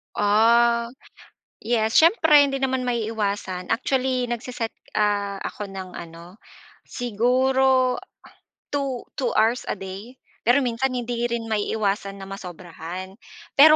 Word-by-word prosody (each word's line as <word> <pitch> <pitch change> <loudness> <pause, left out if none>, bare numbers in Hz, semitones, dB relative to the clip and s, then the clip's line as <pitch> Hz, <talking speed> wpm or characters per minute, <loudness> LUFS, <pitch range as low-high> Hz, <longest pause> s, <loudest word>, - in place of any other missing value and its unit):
Ah, 235 +3 +3 0.7
yes. 225 -1 +1
Siyempre 320 -4 +6
hindi 275 -1 -2
naman 260 -1 0
maiiwasan. 210 -6 -2
Actually 255 +1 0
nag-se-set, 240 -1 -3 0.2
ah, 205 -2 0
ako 210 - -5
ng 185 -2 -7
ano, 170 +2 -10 0.5
siguro 255 +2 +2 0.7
2 275 -4 -2 0.2
2 255 -4 0
hours 230 +3 +2
a - - -1
day. 195 +4 -8 0.3
Pero 250 +4 +5
minsan 250 +2 0
hindi 240 -1 -2
rin 235 -1 -2
maiiwasan 205 -2 -1
na 195 - -9
masobrahan. 185 0 -8 0.4
Pero 305 +2 +9
235 Hz, 115 wpm, -24 LUFS, 200-255 Hz, 0.7 s, Pero